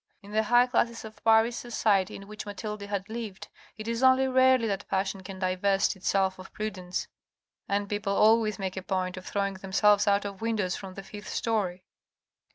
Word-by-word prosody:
In 200 - -12
the 215 +1 +2
high 240 +3 +5
classes 235 -2 0
of 220 0 -12
Paris 225 +1 +4
society 215 -5 +1
in 195 - -10
which 210 0 -8
Mathilde 210 +1 -5
had 200 -1 -4
lived, 220 -4 -6 0.3
it 215 0 -7
is 230 +1 -2
only 260 0 +5
rarely 260 -2 +4
that 205 -2 -3
passion 195 0 -1
can 190 0 -8
divest 190 +2 +1
itself 190 0 0
of 185 - -11
prudence, 185 -4 -4 0.6
and 200 0 0
people 205 -1 -2
always 215 -1 +4
make 190 -2 -4
a 190 - -4
point 185 -1 -2
of 185 0 -9
throwing 200 -1 -1
themselves 200 +2 +3
out 200 0 +3
of 200 0 -6
windows 215 -5 0
from 190 -2 -8
the 195 - -7
fifth 205 +1 -9
storey. 190 -6 -1
205 Hz, 185 wpm, -28 LUFS, 190-220 Hz, 0.6 s, high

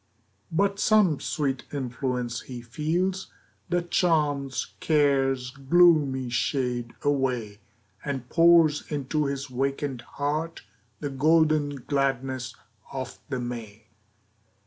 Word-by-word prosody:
But 200 +4 +1
some 205 -10 +4
sweet 135 -4 -2
influence 125 -3 -3
he 125 -2 -8
feels, 175 +10 -2 0.4
That 175 0 -1
charms 145 -6 +1
care's 135 -4 +2
gloomy 140 -3 +3
shade 120 -1 -1
away, 130 -7 0 0.4
And 135 -4 -4
pours 165 -1 +5
into 150 +1 -1
his 140 -1 -3
wakened 135 0 -2 0.2
heart 155 +3 -2 0.4
The 145 - -3
golden 150 -1 +2
gladness 135 -3 -1 0.4
of 130 -1 -6
the 130 -3 -2
May. 115 -3 -7
140 Hz, 100 wpm, -26 LUFS, 125-155 Hz, 0.4 s, pours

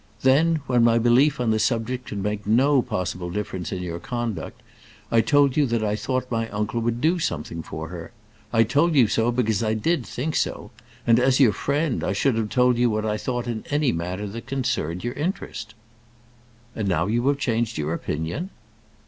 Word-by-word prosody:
Then, 155 +5 +4
when 125 -2 +3
my 115 0 +5
belief 125 +5 +4
on 120 -2 +1
the 110 - +1
subject 125 +2 -1
could 100 -2 -4
make 105 0 -3
no 130 +5 +4
possible 90 -4 -3
difference 95 -2 -4
in 90 -1 -3
your 85 -1 -4
conduct, 120 -1 -5 0.5
I 115 - +5
told 140 +3 +3
you 150 -2 +3
that 115 -2 0
I 105 -1 0
thought 125 +4 -2
my 115 -1 -1
uncle 105 +3 -2
would 120 +1 -1
do 170 +3 +2
something 85 - -3
for 80 0 -7
her. 85 +2 -8 0.4
I 115 -1 +4
told 145 +8 +2
you 130 -4 +6
so 115 +3 +1
because 110 -4 0
I 110 -1 0
did 160 +6 0
think 150 +7 -4
so; - - -2 0.3
and 115 0 +5
as 130 +1 +3
your 120 -7 +5
friend, 145 0 -1
I 95 - 0
should 130 +7 +2
have 110 -1 -1
told 125 -1 +3
you 120 0 +4
what 110 0 -1
I 105 -1 0
thought 120 +2 -3
in 115 -2 -4
any 145 -2 +2
matter 90 +5 -3
that 110 +3 -7
concerned 105 - -2
your 120 +1 -2
interest." 145 - -4 1.0
"And 105 -3 -2
now 90 -3 +1
you 120 +5 0
have 140 0 +3
changed 115 -4 -1
your 75 +1 -1
opinion?" 85 - -3
115 Hz, 200 wpm, -24 LUFS, 105-130 Hz, 1.0 s, you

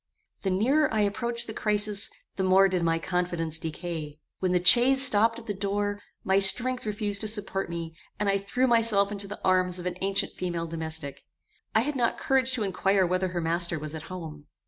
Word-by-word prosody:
The 195 - -1
nearer 265 +11 +2
I 220 -1 +1
approached 235 +3 -1
the 220 - -7
crisis, 210 -1 +2 0.3
the - - -3
more 190 +1 +4
did 185 -2 -1
my 165 -1 +1
confidence 165 -2 -3
decay. 160 -2 -6 0.2
When 185 -1 0
the 180 0 0
chaise 260 +7 +6
stopped 230 -1 +3
at 235 - -10
the 210 - -3
door, 205 +1 -2 0.2
my 190 +1 +2
strength 245 +5 +3
refused 205 -1 -1
to 215 - -2
support 205 -3 0
me, 165 -1 -6 0.3
and 205 - -1
I 195 0 +2
threw 245 +6 -1
myself 225 -4 +3
into 200 -1 -2
the 205 - -8
arms 185 -1 +3
of 180 - -7
an 180 0 -3
ancient 195 0 0
female 175 -2 -4
domestic. 160 -4 -5 0.5
I 220 - +5
had 290 +4 -3
not 240 -3 0
courage 265 -1 +1
to 240 -4 0
inquire 195 0 +1
whether 185 +1 0
her 175 -1 -4
master 170 +1 -1
was 155 0 -6
at 160 - -6
home. 155 -5 -9
195 Hz, 200 wpm, -26 LUFS, 175-215 Hz, 0.5 s, chaise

